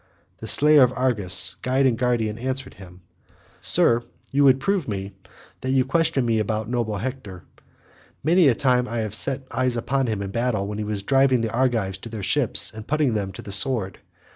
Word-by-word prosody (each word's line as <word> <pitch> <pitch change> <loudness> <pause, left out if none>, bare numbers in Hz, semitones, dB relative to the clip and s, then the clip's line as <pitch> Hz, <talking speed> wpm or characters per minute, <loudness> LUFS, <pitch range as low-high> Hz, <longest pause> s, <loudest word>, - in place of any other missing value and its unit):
The - - -8
slayer 150 0 +5
of 125 -1 +5
Argus, 110 -8 +3
guide 130 +2 +1
and 125 -3 +2
guardian, 115 -3 -1
answered 130 +1 -4
him, 90 -2 -15 0.6
"Sir, 120 0 +4 0.3
you 145 +1 +2
would 135 -1 +5
prove 190 +2 -1
me, 100 -2 -5 0.5
that 130 - -4
you 130 -1 +2
question 140 -3 +1
me 115 -1 +1
about 110 0 -2
noble 115 -3 -2
Hector. 105 -7 -7 0.8
Many 170 +2 +4
a 125 - +3
time 125 -1 +1
have 115 - -7 0.2
I - - -15
set 135 0 -1
eyes 130 -2 -1
upon 135 +2 -1
him 105 -3 -3
in 95 - -6
battle 115 -3 -1
when 105 +1 -5
he - - -2
was 105 -1 -4
driving 135 +1 +2
the 115 -1 -3
Argives 115 -7 -1
to 115 - -10
their 110 -3 -7
ships 95 - 0
and 110 0 -10
putting 150 -4 0
them 100 -3 -3
to - - -10
the 100 - -9
sword. 100 -3 +1
120 Hz, 195 wpm, -23 LUFS, 105-130 Hz, 0.8 s, slayer